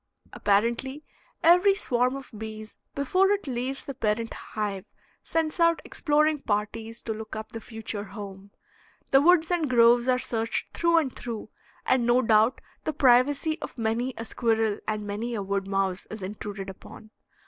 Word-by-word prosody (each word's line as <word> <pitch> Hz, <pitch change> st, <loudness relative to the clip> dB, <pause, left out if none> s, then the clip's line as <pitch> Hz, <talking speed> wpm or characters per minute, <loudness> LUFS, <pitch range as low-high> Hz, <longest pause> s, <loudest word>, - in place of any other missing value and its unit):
Apparently, 235 Hz, +8 st, 0 dB, 0.4 s
every 360 Hz, +4 st, +6 dB
swarm 250 Hz, -, 0 dB
of 275 Hz, -1 st, -9 dB
bees 215 Hz, 0 st, -8 dB, 0.2 s
before 370 Hz, +8 st, +2 dB
it 410 Hz, 0 st, +1 dB
leaves 260 Hz, +1 st, -3 dB
the 275 Hz, -, -6 dB
parent 225 Hz, -2 st, -1 dB
hive 205 Hz, -2 st, -4 dB, 0.4 s
sends 320 Hz, 0 st, -1 dB
out 335 Hz, -1 st, +4 dB
exploring 300 Hz, 0 st, +2 dB
parties 225 Hz, 0 st, -3 dB
to 225 Hz, -, -2 dB
look 220 Hz, 0 st, -7 dB
up 220 Hz, 0 st, -6 dB
the 225 Hz, -, -7 dB
future 220 Hz, -2 st, -6 dB
home. 200 Hz, -1 st, -9 dB, 0.6 s
The 270 Hz, -, +6 dB
woods 335 Hz, +1 st, +4 dB
and 330 Hz, -5 st, +1 dB
groves 240 Hz, 0 st, +5 dB
are 255 Hz, -1 st, +4 dB
searched 230 Hz, -2 st, -3 dB
through 335 Hz, 0 st, +3 dB
and 280 Hz, -6 st, +1 dB
through, 230 Hz, -3 st, -6 dB, 0.4 s
and 255 Hz, -1 st, +3 dB
no 245 Hz, +2 st, +4 dB
doubt 220 Hz, +2 st, +3 dB, 0.2 s
the 310 Hz, -, -2 dB
privacy 285 Hz, +4 st, +3 dB
of -, -, -7 dB
many 235 Hz, +3 st, -1 dB
a 230 Hz, -, -5 dB
squirrel 225 Hz, -3 st, 0 dB
and 215 Hz, -1 st, -2 dB
many 220 Hz, +4 st, -3 dB
a 205 Hz, -, -2 dB
wood 195 Hz, 0 st, -2 dB
mouse 195 Hz, -1 st, -1 dB
is 215 Hz, -2 st, -7 dB
intruded 200 Hz, 0 st, -6 dB
upon. 215 Hz, +3 st, -14 dB
235 Hz, 160 wpm, -27 LUFS, 215-280 Hz, 0.6 s, every